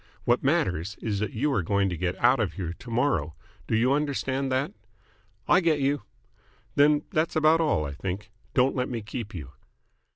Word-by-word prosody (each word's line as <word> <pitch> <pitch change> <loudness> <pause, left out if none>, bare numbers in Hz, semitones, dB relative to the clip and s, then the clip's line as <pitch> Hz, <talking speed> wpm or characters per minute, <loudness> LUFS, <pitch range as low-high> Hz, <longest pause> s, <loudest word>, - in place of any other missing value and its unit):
What 120 +1 +2
matters 100 - +1
is 105 -3 -2
that 110 - -2
you 140 +6 0
are 100 - +2
going 100 +3 +1
to 90 - -3
get 90 +2 -2
out 125 +2 +4
of 105 -6 0
here 85 -4 -4
to 120 - -12
morrow. 115 - 0 0.3
Do - - +1
you 120 +4 +3
understand 140 -2 -1
that?" 130 -3 0 0.7
"I 180 - +6
get 165 -5 +2
you." 140 +1 +1 0.7
"Then 145 +1 +4
that's 155 +1 0
about 155 +1 +4
all, 150 - +1
I 70 - -4
think. 95 +6 -5 0.2
Don't 130 +1 +3
let 125 -1 -1
me 115 -4 -4
keep 105 0 -6
you." 75 -6 -7
120 Hz, 190 wpm, -27 LUFS, 100-145 Hz, 0.7 s, I